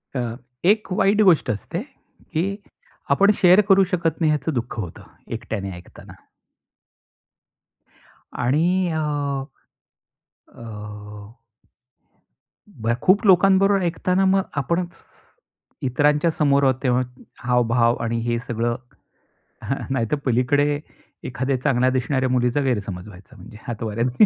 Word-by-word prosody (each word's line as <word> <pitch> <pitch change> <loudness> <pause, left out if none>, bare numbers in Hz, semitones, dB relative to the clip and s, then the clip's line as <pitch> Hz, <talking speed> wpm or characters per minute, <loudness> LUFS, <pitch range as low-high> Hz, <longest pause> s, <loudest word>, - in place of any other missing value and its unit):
अ, - - 0 0.5
एक 210 +1 +2
वाईट 200 +3 +3
गोष्ट 180 -6 +4
असते 160 - -4
की 200 - -6 0.6
आपण 200 +8 +5
शेअर 185 +3 +7
करू 195 0 +6
शकत 165 -4 0
नाही 155 - +3
याचं 150 +1 -1
दुःख 120 -1 -3
होतं, 90 -6 -7 0.3
एकट्याने 110 -4 -4
ऐकताना. 90 +1 -13 2.2
आणि 175 +8 +1
अ, 160 - -2 1.6
अ, - - -12 2.2
ब 115 +2 +1
खूप 200 +5 +3
लोकांबरोबर 195 +1 +5
ऐकताना 180 +2 +1
मग 195 0 +3 0.2
आपण 170 +6 -1 1.0
इतरांच्या 145 +5 +2
समोर 140 -2 +3
आहोत 130 -2 +4
तेव्हा 125 -1 +2 0.5
हावभाव 120 -1 +3
आणि 115 0 -1
हे 120 0 +1
सगळं 120 0 -1 1.2
नाहीतर 120 0 0
पलीकडे 145 +4 +2 0.5
एखाद्या 130 +2 -1
चांगल्या 130 -3 +2
दिसणाऱ्या 130 0 0
मुलीचा 125 +2 +1
गैरसमज 105 -7 -2
व्हायचा 95 -2 -15
म्हणजे 105 - -13
हातवाऱ्यांनी. 115 - +1
135 Hz, 105 wpm, -22 LUFS, 120-180 Hz, 2.2 s, शेअर